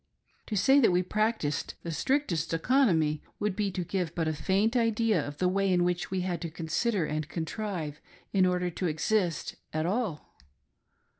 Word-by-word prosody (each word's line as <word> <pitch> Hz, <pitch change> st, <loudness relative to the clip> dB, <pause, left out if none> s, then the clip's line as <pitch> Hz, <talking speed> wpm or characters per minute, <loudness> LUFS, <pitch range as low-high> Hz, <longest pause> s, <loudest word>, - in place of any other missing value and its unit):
To 215 Hz, -, -3 dB
say 265 Hz, +9 st, +5 dB
that 240 Hz, -, +5 dB
we 180 Hz, +1 st, +2 dB
practiced 215 Hz, -7 st, -1 dB
the 170 Hz, -, -4 dB
strictest 170 Hz, -, 0 dB
economy 165 Hz, -, +2 dB, 0.2 s
would 205 Hz, -2 st, -1 dB
be 205 Hz, -1 st, 0 dB
to 180 Hz, -1 st, -3 dB
give 175 Hz, -2 st, -2 dB
but 165 Hz, -2 st, 0 dB
a 155 Hz, -, +1 dB
faint 195 Hz, -, +1 dB
idea 225 Hz, -6 st, +2 dB
of 145 Hz, 0 st, -7 dB
the 180 Hz, -, +2 dB
way 195 Hz, +1 st, +1 dB
in 180 Hz, -1 st, +3 dB
which 180 Hz, 0 st, -1 dB
we 190 Hz, -1 st, -1 dB
had 180 Hz, -1 st, -2 dB
to 170 Hz, -, -3 dB
consider 170 Hz, +4 st, -1 dB
and 150 Hz, 0 st, -3 dB
contrive 165 Hz, -3 st, -4 dB, 0.3 s
in 190 Hz, -2 st, +4 dB
order 180 Hz, -1 st, 0 dB
to 180 Hz, +2 st, -2 dB
exist 170 Hz, +2 st, 0 dB
at 155 Hz, +1 st, -1 dB
all. 195 Hz, -4 st, -2 dB
180 Hz, 175 wpm, -29 LUFS, 160-210 Hz, 0.3 s, say